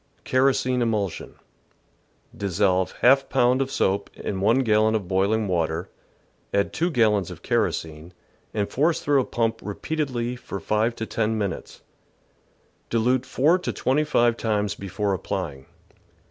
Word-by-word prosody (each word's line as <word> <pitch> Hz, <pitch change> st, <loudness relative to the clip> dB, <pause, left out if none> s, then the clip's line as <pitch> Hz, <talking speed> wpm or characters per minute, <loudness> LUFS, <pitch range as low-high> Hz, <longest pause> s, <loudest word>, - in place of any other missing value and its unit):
Kerosene 130 Hz, -1 st, +2 dB
Emulsion. 105 Hz, -7 st, -2 dB, 0.5 s
— -, -, -30 dB
^Dissolve 95 Hz, -1 st, 0 dB
^^ 135 Hz, +2 st, +5 dB
pound 125 Hz, +2 st, +3 dB
of 135 Hz, -, -1 dB
soap 100 Hz, -6 st, 0 dB
in 95 Hz, -2 st, -4 dB
1 115 Hz, +6 st, +4 dB
gallon 110 Hz, -2 st, +3 dB
of 100 Hz, -5 st, -2 dB
boiling 100 Hz, +4 st, +1 dB
water, 85 Hz, 0 st, -1 dB, 0.6 s
add 100 Hz, 0 st, 0 dB
2 170 Hz, +2 st, 0 dB
gallons 110 Hz, -, +2 dB
of -, -, -10 dB
kerosene, 80 Hz, +1 st, -2 dB, 0.4 s
and 105 Hz, -2 st, -1 dB
force 155 Hz, +5 st, +1 dB
through 140 Hz, -2 st, +2 dB
a -, -, -4 dB
pump 115 Hz, -1 st, -1 dB
repeatedly 125 Hz, +2 st, -3 dB
for 100 Hz, -5 st, -7 dB
five 110 Hz, +4 st, 0 dB
to 110 Hz, -, -4 dB
ten 110 Hz, 0 st, -1 dB
minutes; 100 Hz, -4 st, -4 dB, 1.1 s
dilute 125 Hz, +3 st, +1 dB
four 160 Hz, +7 st, +3 dB
to 180 Hz, -, -3 dB
twenty 140 Hz, +4 st, +1 dB
five 120 Hz, -6 st, +2 dB
times 105 Hz, -2 st, 0 dB
before 100 Hz, 0 st, -2 dB
applying. 90 Hz, -8 st, -4 dB
110 Hz, 140 wpm, -24 LUFS, 100-125 Hz, 1.1 s, ^^